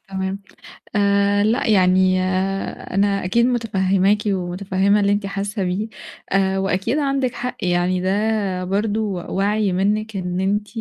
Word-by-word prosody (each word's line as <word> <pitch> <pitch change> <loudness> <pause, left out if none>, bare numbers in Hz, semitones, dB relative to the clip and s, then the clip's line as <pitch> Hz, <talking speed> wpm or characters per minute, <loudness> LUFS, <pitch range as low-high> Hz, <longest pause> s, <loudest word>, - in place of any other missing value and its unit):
تمام. 190 +1 -4 0.5
آآ 200 0 +3
لأ، 225 +3 +1
يعني 185 -2 +4 0.7
أنا 200 0 +1
أكيد 235 +6 +2
مُتفهِّماكِ 200 -4 +2
ومُتفهِّمة 190 +2 0
اللي 200 0 +2
أنتِ 205 0 0
حاسّة 200 +1 -3
بيه 185 +4 -2 0.4
آآ 195 0 +2
وأكيد 195 +7 0
عندكِ 275 -3 0
حق 250 +1 -4
يعني 180 0 +1
ده 200 -1 0
برضه 205 +3 -1 0.3
وَعْي 205 +1 0
منِّك 210 +2 0
إن 180 -1 -3
أنتِ 205 +2 0
200 Hz, 130 wpm, -21 LUFS, 190-210 Hz, 0.7 s, يعني